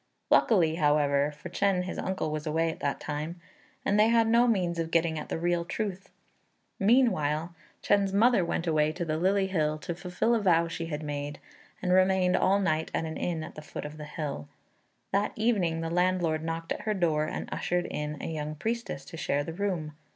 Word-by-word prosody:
Luckily, 165 -8 +4
however, 145 -2 +3
for 150 +4 -10
Chên 190 0 +1
his 180 - -5
uncle 185 -5 -2
was 155 +1 -4
away 165 +2 +1
at - - -10
that 140 - -1
time, 155 +3 -4 0.5
and 205 -2 +2
they 215 - +6
had 230 -1 +4
no 235 +2 +4
means 180 -7 +1
of 165 -1 -1
getting 165 -1 +1
at - - -8
the - - -2
real 175 +1 0
truth. 195 +1 -4 0.7
Meanwhile, 175 - +2 0.3
Chên's 200 -1 +3
mother 220 0 +4
went 170 0 -2
away 155 -2 +2
to 175 +1 -3
the 155 -1 -1
Lily 195 +2 +2
Hill 155 -5 0
to 175 +3 -5
fulfil 180 +6 -1
a 230 - +3
vow 170 -4 +3
she 165 0 -4
had 155 -1 -4
made, 145 -1 -4 0.5
and 180 - +1
remained 185 -1 +4
all 195 +2 +3
night 160 -5 0
at - - 0
an 160 0 -5
inn 165 -3 -2
at 160 - -8
the 155 - -9
foot 150 - -7
of 150 +1 -7
the 150 - -7
hill. 145 - -5 0.6
That 200 +2 +1
evening 195 -8 +1
the 165 0 -3
landlord 175 -3 +1
knocked 165 0 -4
at - - -2
her 215 -1 -1
door 160 -5 +1
and - - -4
ushered 175 0 -1
in 150 0 -4
a - - -5
young 155 -1 -4
priestess 225 -7 -3
to 150 +4 -9
share 145 -2 0
the 165 - -6
room. 175 -5 -2
170 Hz, 205 wpm, -28 LUFS, 155-190 Hz, 0.7 s, they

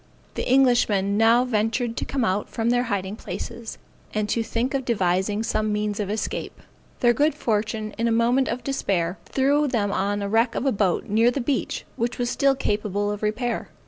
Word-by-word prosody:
The - - -3
Englishmen 235 -7 +3
now 230 +3 +4
ventured 230 +1 0
to - - -2
come 265 -4 -1
out 200 +1 -1
from 230 +1 0
their 245 0 +2
hiding 200 -3 -2
places, 235 0 -7 0.4
and 215 -1 0
to 230 - +1
think 230 +4 -2
of 270 -1 0
devising 205 -2 0
some 215 -1 0
means 210 0 -1
of 205 -2 -2
escape. 215 +1 -3 0.4
Their 240 -1 +5
good 295 +4 +2
fortune 215 -3 -1
in 230 - +2
a - - +1
moment 240 +3 +3
of 245 +2 -3
despair, 185 -10 -1
threw 285 +2 +2
them 215 -6 0
on 200 +1 0
the 200 -1 -2
wreck 230 +3 +2
of - - -2
a 270 - +3
boat, 195 -5 +1
near 225 +3 +3
the 245 - -2
beach, 260 +1 -2
which 235 +1 -1
was 245 0 -1
still 275 -1 +3
capable 205 -4 -1
of 205 - -5
repair. 230 +3 -2
225 Hz, 195 wpm, -24 LUFS, 205-245 Hz, 0.4 s, Their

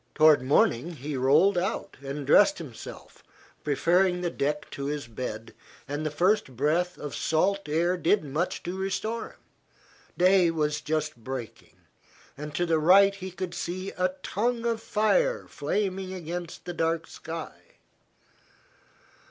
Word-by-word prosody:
Toward 155 -3 +6
morning 130 +3 +2
he 145 +1 -5
rolled 155 +9 +4
out 190 +5 -3
and 140 +1 -5
dressed 195 +7 +5
himself, 140 -9 -10 0.4
preferring 180 +5 +2
the 175 -1 -1
deck 150 +2 -2
to 140 - -5
his 145 -1 -3
bed, 115 -1 -6 0.3
and 145 +2 -3
the 155 - 0
first 175 - +1
breath 170 +6 +1
of 145 -3 -6
salt 180 +7 0
air 170 +4 +2
did 175 +2 +2
much 150 +5 -2
to 175 +2 -4
restore 195 +4 -3
him. - - -26 0.8
Day 185 -1 +5
was 150 -2 -1
just 155 -2 -2
breaking, 120 0 -8 0.5
and 150 +1 -7
to 175 - +1
the 165 -2 +2
right 195 +5 +6
he 190 -1 -7
could 180 -1 -5
see 185 +2 -4
a 185 0 -1
tongue 235 +3 -1
of 230 -1 0
fire 485 - +1
flaming 190 -2 -2
against 175 0 -6
the 175 - -4
dark 165 -1 0
sky. 165 0 -8
170 Hz, 145 wpm, -27 LUFS, 150-190 Hz, 0.8 s, Toward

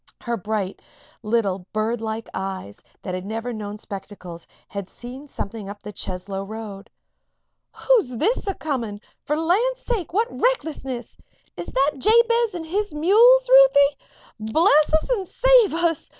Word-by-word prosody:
Her 235 -1 -2
bright 205 -2 -3 0.4
little, 200 -5 -1
birdlike 220 0 -2
eyes, 190 - -5 0.2
that 185 - -4
had 185 0 -4
never 225 +4 -4
yet 225 - -6
known 205 0 -6
spectacles, 195 -5 -9 0.2
had 200 -2 -6
seen 255 +4 -10
something 205 -5 -6
up 205 0 -10
the 210 +1 -8
Cheslow 195 +1 -4
road. 210 -1 -8 1.0
"Who's 435 - +3
this 440 - 0
a 390 - -1
coming? 235 -9 -3 0.3
For 300 - 0
the 320 - -2
land's 485 +9 +1
sake, 450 -10 -3
what 435 +6 +1
recklessness! 290 - -2 0.4
Is 175 - -7
that 275 +3 +1
Jabez 465 - +3
and 330 -2 -5
his 405 +5 -2
mules, 465 +10 +5
Ruthie? - - +6 0.5
Bless 310 - +4
us 315 +8 +1
and 395 -7 -1
save - - +4
us! 335 -2 0
255 Hz, 150 wpm, -23 LUFS, -, 1.0 s, Ruthie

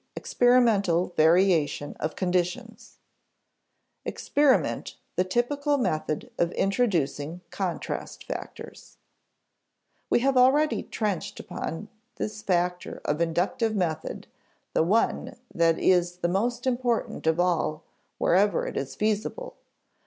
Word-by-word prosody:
Experimental 210 -8 +3
Variation 160 -3 +3
of 155 +1 -3
Conditions 185 +6 -2 1.1
[Sidenote: - - -3
Experiment 285 -2 +1 0.2
the 185 - +2
typical 285 +9 0
method 155 - -2
of 170 0 +2
introducing 175 - 0
contrast 185 -3 -4
factors] - - -8 1.1
We - - +3
have 270 0 +2
already 280 +5 +4
trenched 205 -6 -3
upon 165 +6 -5 0.3
this 210 0 -4
factor 180 -2 -1
of 150 +3 0
inductive 195 +8 0
method, 165 -5 -2 0.5
the - - +3
one 200 +10 +1 0.2
that 165 -1 +3
is 175 -1 +2
the 175 - 0
most 240 +7 -1
important 245 -8 -1
of 160 +1 +2
all 165 -3 0 0.3
wherever 200 +4 +2
it - - -5
is 135 -1 -4
feasible. 215 - -2
185 Hz, 110 wpm, -26 LUFS, 170-240 Hz, 1.1 s, already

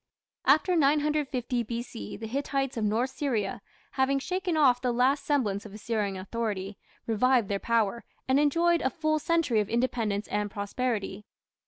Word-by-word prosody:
After 365 - +4
950 290 -5 +1
B.C. 235 - -6
the 225 - -7
Hittites 270 +2 -2
of 225 - -2
North 225 +5 +1
Syria, 235 -9 -2 0.3
having 265 +1 +1
shaken 360 +3 -2
off 255 -5 +4
the 250 -1 +1
last 255 +4 +2
semblance 210 -9 0
of 210 -1 -10
Assyrian 210 -3 -2
authority, 200 -1 -4 0.3
revived 235 0 +2
their 200 -1 0
power, 230 0 0 0.2
and 265 +1 +4
enjoyed 335 +3 +3
a 265 - +1
full 310 +3 0
century 315 -8 +1
of 210 - -1
independence 230 -4 0
and 210 0 -1
prosperity. 205 -1 -3
245 Hz, 150 wpm, -28 LUFS, 210-280 Hz, 0.3 s, After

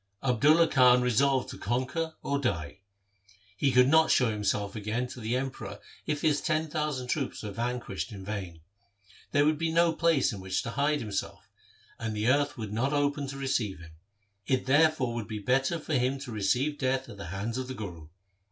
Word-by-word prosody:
Abdulla 150 +6 +4
Khan 125 -3 +5
resolved 130 +2 +2
to - - -8
con 120 +5 0
quer 160 +5 -3
or 140 0 0
die. 85 - -2 0.8
He 135 +5 +1
could 125 0 +5
not 160 +3 +5
show 125 -3 +3
himself 105 0 -1
again 110 +4 -2
to 125 - -9
the 115 +2 -1
Emperor 135 +1 -4 0.3
if 150 -1 -2
his 150 -2 +2
ten 155 -1 -1
thousand 150 -5 -2
troops 135 -2 -2
were 105 - -4
vanquished 120 -1 -3
in 95 -2 -8
vain. 95 -6 -5 0.7
There 145 +1 +3
would 155 0 +2
be 165 0 0
no 170 0 +3
place 165 -6 +2
in 100 - -6
which 95 0 -2
to 115 - -4
hide 145 +3 +1
himself, 105 -3 -5 0.5
and 110 -1 -3
the 105 +3 +1
earth 145 +1 +2
would 110 -3 -5
not 130 +6 0
open 145 0 0
to 135 0 -6
receive 125 -8 -1
him. 85 -1 -12 0.6
It 130 -1 +1
therefore 145 -2 +3
would 115 -3 -4
be 110 -1 -4
better 135 - +1
for 155 0 -5
him 130 0 +1
to 135 -3 -7
receive 125 +8 0
death 130 0 0
at 100 - -10
the 100 - -7
hands 100 +8 -3
of 130 - -4
the 130 - -6
Guru. 85 -9 -7
130 Hz, 200 wpm, -29 LUFS, 110-145 Hz, 0.8 s, Khan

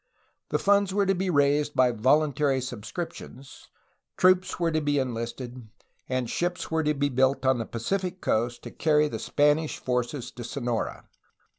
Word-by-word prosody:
The - - +1
funds 200 -1 +2
were 200 -1 +3
to 195 - +3
be 190 0 -1
raised 145 -1 +2
by 130 -1 +4
voluntary 135 +3 +2
subscriptions, 130 - -7 0.5
troops 185 0 +3
were 170 -1 +1
to 155 0 0
be 145 -1 +1
en 130 -2 -1
listed, 120 +1 -6 0.4
and 130 -1 -1
ships 175 +7 -2
were 160 0 +2
to 150 -1 0
be 145 0 +1
built 130 +1 +1
on 130 -2 +3
the 115 - -4
Pacific 185 - -3
coast 120 -2 -1
to - - -8
carry 150 -1 +2
the - - -5
Spanish 150 +2 +1
forces 125 +1 -2
to 120 - -8
Sonora. 120 -1 -3
140 Hz, 165 wpm, -26 LUFS, 125-160 Hz, 0.5 s, by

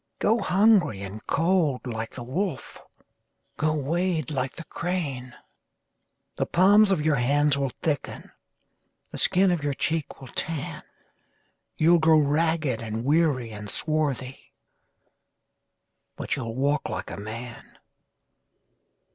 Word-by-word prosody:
Go 225 +3 +2
hungry 195 - +3
and 100 +3 -8
cold 165 -6 +1
like 115 -2 -5
the 120 - -6
wolf, 160 +5 -4 0.8
Go 155 0 +1
wade 160 +1 -1
like 130 -2 -2
the 165 - -7
crane:The 150 -8 -7
palms 200 +4 +5
of 165 -6 +1
your 155 -2 +3
hands 145 +4 +3
will 140 -1 -1
thicken, 145 +2 -4 0.8
The - - -4
skin 185 +1 +3
of 170 -4 -1
your 145 -1 -1
cheek 160 0 -2
will 130 - -11
tan, 160 -3 -4 1.0
You 165 +2 +5
'll 170 - +5
grow 160 0 +5
ragged 155 -3 +1
and 115 +1 -4
weary 145 -6 +2
and 105 -1 -7
swarthy, 140 -4 -2 1.6
But - - -2
you 130 - -4
'll 115 0 -5
walk 140 +2 0
like - - -5
a - - -6
man! 115 +4 -8
150 Hz, 125 wpm, -26 LUFS, 125-165 Hz, 1.6 s, palms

